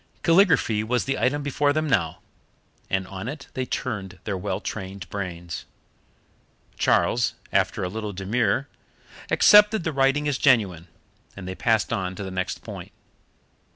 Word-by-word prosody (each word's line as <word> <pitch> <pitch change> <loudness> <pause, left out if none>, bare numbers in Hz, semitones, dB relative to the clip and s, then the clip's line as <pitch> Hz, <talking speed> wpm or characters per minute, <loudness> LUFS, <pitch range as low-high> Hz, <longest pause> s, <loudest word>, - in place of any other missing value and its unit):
Calligraphy 165 - +4
was 120 +3 0
the 135 0 -1
item 135 +6 +1
before 145 0 +1
them 155 +1 0
now, 90 - 0 0.7
and 95 -1 0
on 95 +2 -7
it 140 +2 -6
they 130 -1 -3
turned 100 -9 -4
their 105 - -2
well 95 0 -3
trained 95 -3 -6
brains. 85 -4 -5 1.1
Charles, 120 +1 +2 0.2
after - - +1
a - - 0
little 105 +2 -4
demur, 110 +8 0 0.6
accepted 210 -1 +6
the 160 - -2
writing 135 +2 +2
as 145 -2 0
genuine, 100 - +3 0.5
and 95 -2 -7
they 95 - -3
passed 110 +4 +1
on 95 -1 -2
to 100 - -6
the 95 - -6
next 90 -1 -3
point. - - -8
110 Hz, 150 wpm, -24 LUFS, 95-135 Hz, 1.1 s, accepted